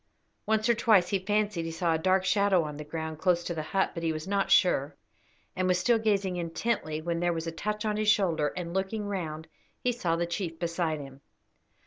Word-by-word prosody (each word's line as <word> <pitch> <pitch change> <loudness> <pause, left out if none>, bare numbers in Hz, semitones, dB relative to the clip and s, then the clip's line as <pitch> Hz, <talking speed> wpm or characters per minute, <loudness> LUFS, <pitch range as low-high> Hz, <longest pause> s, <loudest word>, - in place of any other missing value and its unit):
Once 220 +1 +2
or 235 - +5
twice 215 -6 +4
he 195 - +1
fancied 205 -2 0
he 165 - -4
saw 165 0 0
a - - +2
dark 185 +2 +2
shadow 195 -2 +3
on 150 -1 -5
the 150 - -6
ground 160 0 -5
close 175 -1 +2
to 170 - -3
the 160 - -3
hut, 190 +5 0
but 170 - -5
he 165 -1 0
was 155 +2 -5
not 200 0 0
sure, 145 -6 +3 0.6
and 185 0 0
was 180 -1 +3
still 230 +5 +3
gazing 200 -4 0
intently 165 -1 -2
when 170 +1 -2
there 175 0 +1
was 165 0 -4
a 165 - -3
touch 210 +6 -3
on 210 -1 0
his 215 0 +1
shoulder, 170 -8 +2
and, 170 -1 -4
looking 195 +3 -2
round, 160 -6 -4 0.4
he 250 - +2
saw 180 -9 -1
the 170 +1 0
chief 170 -1 -4
beside 170 -2 -1
him. 135 -1 -10
180 Hz, 225 wpm, -28 LUFS, 165-205 Hz, 0.6 s, or